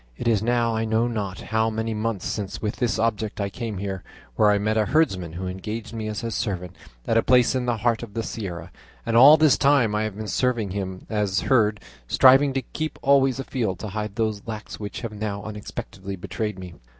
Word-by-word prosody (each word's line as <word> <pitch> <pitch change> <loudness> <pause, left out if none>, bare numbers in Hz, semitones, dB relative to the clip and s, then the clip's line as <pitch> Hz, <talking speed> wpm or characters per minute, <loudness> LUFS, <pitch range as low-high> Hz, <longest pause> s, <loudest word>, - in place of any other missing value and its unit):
It - - -3
is 110 -4 +3
now 120 0 +1
I 110 - 0
know 110 +1 +1
not 100 -6 -4
how 110 0 0
many 110 0 -2
months 110 -2 -2
since 100 -2 -3
with 105 -1 -3
this 120 -2 0
object 110 -2 -1
I 100 -1 -1
came 115 -2 -5
here, 95 -1 -4 0.3
where 105 - +4
I 105 - +4
met 105 +2 0
a 110 -2 +2
herdsman 95 - +1
who 90 +2 -5
engaged 105 +5 -5
me 110 -1 -4
as 105 -1 -3
his 115 -1 -3
servant 90 -5 -3 0.3
at 115 - +2
a - - +5
place 125 +1 +4
in 125 -1 -1
the 120 -2 +1
heart 115 +1 +1
of 115 -3 -9
this 115 - -2
Sierra, 95 -6 -6 0.3
and 115 - -1
all 140 +6 +9
this 155 -3 +4
time 135 -6 +4
I 105 - +1
have 110 -2 -3
been 110 0 -5
serving 115 -3 0
him 95 -1 -5
as 105 -3 0
herd, 110 -5 +2 0.3
striving 135 - +6
to 135 -1 -1
keep 155 +5 -5
always 135 -1 +4
afield 120 -8 -2
to 110 - -6
hide 105 0 -4
these 110 -2 -1
locks 110 -1 -6
which 105 -1 -6
have 115 -3 -5
now 105 -1 -4
unexpectedly 100 -2 -7
betrayed 100 +3 -4
me. 90 -2 -8
110 Hz, 220 wpm, -24 LUFS, 100-115 Hz, 0.3 s, all